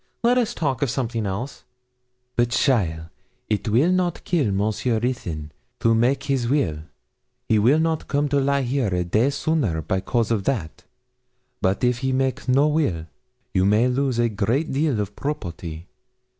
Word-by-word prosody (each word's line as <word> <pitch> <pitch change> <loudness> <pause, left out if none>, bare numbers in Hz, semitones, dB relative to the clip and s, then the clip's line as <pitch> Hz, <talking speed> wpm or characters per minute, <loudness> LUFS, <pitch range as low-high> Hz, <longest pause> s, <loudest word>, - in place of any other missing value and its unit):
Let 245 +2 +4
us 240 -1 -1
talk 135 -6 -1
of 140 - +1
something 115 -4 -2
else.' 105 +8 -5 0.7
'But, 120 0 +2
cheaile, 90 - +1 0.4
it 105 +1 0
will 130 +11 +3
not 180 -2 0
kill 150 - +1
Monsieur 110 +4 0
Ruthyn 85 -11 -3 0.3
to 115 - +3
make 120 +5 +2
his 135 -4 0
will; 95 - +1 0.7
he 110 - +3
will 125 +8 +4
not 160 -1 0
come 145 +1 +1
to 140 0 +2
lie 140 0 +1
here 130 -1 0
a 90 -2 0
day 110 +9 +2
sooner 140 - 0
by 95 +5 -1
cause 115 +1 0
of 105 -4 0
that; 105 -13 -3 0.8
but 95 +5 0
if 125 -1 +2
he 130 0 -1
make 130 0 -1
no 140 +4 +4
will, 145 - 0 0.5
you 95 -2 +3
may 105 +5 +4
lose 130 -1 0
a 120 0 +3
great 115 +9 0
deal 145 +2 +1
of 105 - 0
the - - -21
property. 85 - -5
120 Hz, 170 wpm, -23 LUFS, 100-140 Hz, 0.8 s, Let